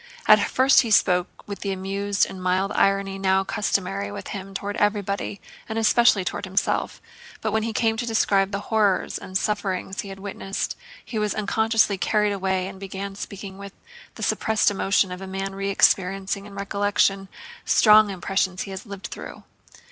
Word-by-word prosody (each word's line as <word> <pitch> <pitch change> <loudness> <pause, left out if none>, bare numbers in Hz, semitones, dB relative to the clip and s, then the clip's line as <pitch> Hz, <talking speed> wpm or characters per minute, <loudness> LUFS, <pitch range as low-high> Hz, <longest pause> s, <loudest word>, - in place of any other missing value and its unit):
At - - +8
first 260 +1 +5
he 235 - -3
spoke 180 -4 +2
with 200 -1 -6
the 200 - -3
amused 195 +1 0
and 190 - -9
mild 185 +2 +1
irony 195 -1 +1
now 190 0 +2
customary 100 - -1
with - - -7
him 195 -1 -7
toward 205 +1 -3
everybody 205 -1 -1 0.3
and 220 - -3
especially 225 -3 +4
toward 195 - -3
himself, 190 +1 -1 0.4
but - - -2
when 220 - +1
he 225 +1 -2
came 225 0 +1
to 240 - -2
describe 200 -3 +2
the 200 0 -3
horrors 210 -3 +1
and 185 0 -3
sufferings 195 -2 -2
he 200 - -9
had 195 0 -9
witnessed 195 0 -4 0.3
he 220 - -4
was 210 -1 -1
unconsciously 220 -1 +1
carried 210 +1 +1
away 190 -1 -1
and 190 0 -9
began 195 0 -6
speaking 195 -1 -8
with 200 -1 -9 0.4
the - - -7
suppressed 220 -2 +2
emotion 195 -1 +1
of 180 +1 -6
a 190 - -6
man 195 +1 -4
re 195 0 -3
experiencing 195 +1 +1
in 200 - -12
recollection 200 -1 0 0.4
strong 215 -1 +6
impressions 190 0 -1
he 195 - -8
has 190 +4 -8
lived 200 -1 -8
through. - - -8
195 Hz, 175 wpm, -24 LUFS, 190-210 Hz, 0.4 s, At